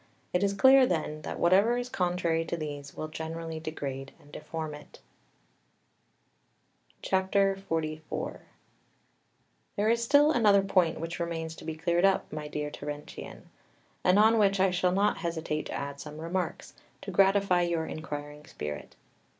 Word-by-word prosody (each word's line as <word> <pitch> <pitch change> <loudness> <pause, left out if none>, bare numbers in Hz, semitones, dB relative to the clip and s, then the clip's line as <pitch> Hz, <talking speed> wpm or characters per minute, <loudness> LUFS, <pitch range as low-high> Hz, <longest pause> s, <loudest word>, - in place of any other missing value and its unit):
It 180 - +2
is 200 0 +2
clear, 265 +5 +6
then, 155 -4 -2
that - - -5
whatever 200 +7 +4
is 245 0 -3
contrary 175 -6 0
to 170 - -3
these 145 -3 -6
will 155 - -3
generally 160 +1 -5
degrade 135 -4 -5
and 145 - -19
deform 155 0 -5
it. 150 0 -12 2.0
XLIV 190 -5 -1 1.4
There 210 +1 +1
is 235 0 +1
still 285 +5 +5
another 210 -8 +4
point 185 -4 +2
which 165 +2 -5
remains 165 -1 -3
to - - -11
be 160 - -4
cleared 170 +2 +1
up, 195 -4 +2
my 150 -1 -4
dear 150 0 -4
Terentian, 145 +1 -8 0.5
and 185 +2 +4
on 220 +2 +5
which 200 -2 +3
I 190 0 +4
shall 180 0 +2
not 200 +3 +2
hesitate 160 -3 -3
to - - -6
add 140 0 -5
some 150 +1 -8
remarks, 175 +3 -3 0.3
to - - -5
gratify 195 -2 +4
your 170 -2 0
inquiring 150 -1 -7
spirit. 75 0 -7
170 Hz, 145 wpm, -29 LUFS, 155-195 Hz, 2.0 s, clear